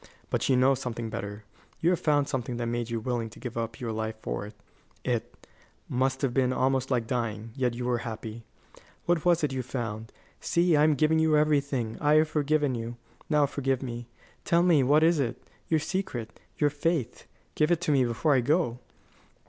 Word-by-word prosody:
But - - 0
you 130 - +5
know 130 +2 +5
something 120 -4 -4
better. 100 0 -5 0.4
You 175 +2 +3
found 150 -4 +1
something 125 -4 -3
that 120 - -2
made 120 0 -2
you 115 -1 -1
willing 115 -1 -2
to 100 - -14
give 125 -2 -6
up 115 -1 -4
your 120 -2 -3
life 110 0 -3
for 105 - -4
it 105 - -13 0.5
it, - - -3 0.4
must 130 +2 0
have 130 -3 +1
been 130 -1 +2
almost 130 0 +1
like 125 -4 +1
dying 115 -2 -3
yet 125 -3 0
you 120 0 -4
were 125 -1 +1
happy. 115 -1 -6 0.6
What 175 -2 +1
was 175 -2 +3
it 145 -3 0
you 130 - -1
found? 115 -3 -5 0.3
See, 170 -1 +2
I 150 - +5
am 155 -1 +4
giving 155 +3 +3
you 160 -1 +4
everything. 140 -6 +1
I 150 +1 +4
have 155 0 +4
forgiven 150 -2 +1
you. 120 0 -5 0.3
Now 150 -2 +4
forgive 135 -2 -1
me. 120 -2 -6 0.4
Tell 170 0 +3
me, 170 -5 +5
what 145 +4 +4
is 165 -1 +4
it? 125 -4 -1 0.3
Your 160 - +2
secret, 155 - -4 0.2
your 145 -1 +2
faith 145 -4 -2 0.3
give 155 +1 +2
it 175 -2 +3
to 155 - 0
me 135 -3 +4
before 125 +6 +1
I 130 - +4
go." 145 -2 +1
130 Hz, 195 wpm, -28 LUFS, 115-150 Hz, 0.6 s, you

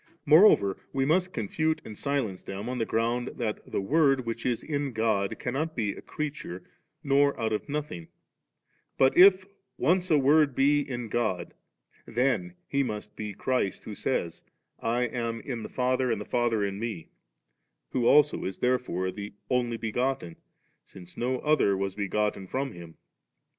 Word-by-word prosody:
Moreover, 155 - +6 0.2
we 135 0 +1
must 180 +5 +2
con 110 - -3
fute 160 +7 0
and 110 - -8
silence 130 -8 -2
them 100 +3 -6
on 125 0 -3
the 115 - -1
ground, 120 +2 -1
thst 110 -3 -4
the - - 0
Word 135 +2 +3
which 115 +1 -3
is 120 -2 -1
in 145 -3 -2
God 110 -3 0
cannot 150 +5 -3
be 110 -4 0
a - - -10
creature 140 -12 -5 0.4
nor 140 0 +3
out 110 -1 0
of 105 - -3
nothing; 140 - -4 0.9
but 130 0 +4
if 190 +1 +7 0.3
once 180 +6 +2
a 155 - +5
Word 145 0 +4
be 145 +2 +4
in 125 -4 -5
God, 105 -7 -2 0.5
then 135 +9 0
He 140 - +1
must 105 -5 -4
be 105 -2 -5
Christ 125 -6 -1
who 110 - -7
says, 95 -7 -2 0.2
* - - -53
I 120 +2 0
am 115 -1 -2
in 120 -1 -5
the - - -7
Father 130 0 0
and 110 - 0
the 105 - -6
Father 120 -3 +1
in 100 0 -3
Me^,' 110 -8 -5 0.8
who 125 -2 +1
also 150 0 +5
is 95 - -4
therefore 125 -8 0
the 100 +2 -8 0.2
Only 120 -2 +1
be 115 -1 -4
gotten, 125 -9 -1 0.5
since 90 -1 -14
no 130 +2 -1
other 150 -10 +3
was 95 0 -2
begotten 105 -1 -1
from 135 +5 -2
Him. 85 -2 -11
120 Hz, 170 wpm, -28 LUFS, 105-140 Hz, 0.9 s, if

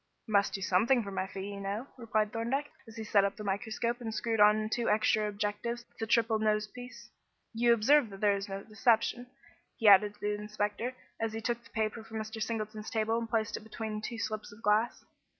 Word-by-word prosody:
"Must 200 -3 +2
do 195 - -5
something 225 +7 +3
for 200 - -6
my 190 0 -2
fee, 195 +1 -6
you 200 - -7
know," 200 +5 -3
replied 220 -3 -1
Thorndyke, 255 +6 -1 0.2
as 225 - -12
he 225 - -5
set 205 -2 +3
up 200 0 0
the 215 - -8
microscope 220 +4 -2
and 225 -2 -4
screwed 225 0 -1
on 210 +1 +5
two 235 +1 -1
extra 215 0 +2
objectives 210 +4 -3
to - - -39
the 225 - -2
triple 225 -1 +3
nose 215 0 +2
piece. 245 +3 -11 0.4
"You 235 +1 +3
observe 235 +3 +4
that 195 -1 -10
there 205 -1 +3
is 200 0 -5
no 195 0 -5
deception," 235 +2 +1 0.5
he 225 - +1
added 205 +1 +7
to - - -26
the 210 0 -1
inspector, 210 +3 -2 0.2
as 225 -1 -1
he 225 - -3
took 235 0 -2
the - - -17
paper 220 0 -2
from 225 0 -7
Mr. 220 +1 -5
Singleton's 215 -1 -3
table 225 +1 0
and 230 -1 -5
placed 220 -1 0
it - - -10
between 220 -1 -5
two 230 +2 -5
slips 215 0 -4
of 210 +2 -15
glass. 215 +3 +1
220 Hz, 220 wpm, -31 LUFS, 210-230 Hz, 0.5 s, added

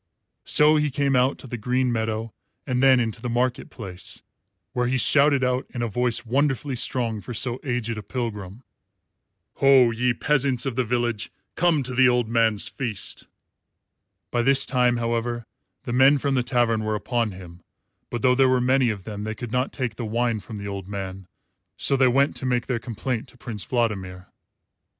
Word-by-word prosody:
So 150 +1 +5
he 150 0 +1
came 140 0 0
out 125 +2 +2
to - - -11
the 120 -1 -5
green 125 +3 0
meadow 110 -1 -2 0.3
and 125 -2 0
then 135 -1 +6
into 115 -1 -2
the 125 - -3
market 120 +1 -1
place, 95 -6 -6 0.5
where 125 -1 0
he 130 +1 +1
shouted 140 +1 +4
out, 125 0 0
in 120 - -2
a - - 0
voice 120 +2 0
wonderfully 135 +2 0
strong 115 -3 -1
for 120 +5 -7
so 125 +2 -1
aged 120 -3 -2
a - - -6
pilgrim, 105 -2 -5 0.9
"Ho, 135 -3 +6
ye 120 +1 0
peasants 135 -2 +1
of 135 -3 -2
the 130 - +1
village, 120 -2 -2 0.2
come 170 -5 +2
to 130 0 -3
the 130 0 +5
old 125 -2 +1
man's 115 -3 +2
feast." 115 -7 -4 1.0
By 120 - +1
this 135 +2 +3
time, 125 -2 +2
however, 120 0 -2 0.4
the 120 - -4
men 135 +3 +6
from 140 0 -1
the 130 - +2
tavern 120 -3 +1
were 110 0 -1
upon 115 0 -1
him; 90 -1 -12 0.5
but 120 -2 -4
though 125 - +5
there 130 0 +4
were 130 0 +3
many 130 0 +3
of 100 -4 -4
them 105 0 -6
they 110 0 -4
could 120 -2 -7
not 125 +2 0
take 125 -6 -3
the - - -4
wine 115 0 0
from 105 +3 -9
the 100 0 -6
old 100 -2 -6
man, 95 -2 -6 0.5
so 140 - +2
they 130 -1 +4
went 135 +3 +2
to 130 - -4
make 125 -1 0
their 125 -3 -1
complaint 120 +2 -4
to 125 - -17
Prince 110 -5 -6
Vladimir. 95 -7 -2
120 Hz, 190 wpm, -24 LUFS, 110-130 Hz, 1.0 s, then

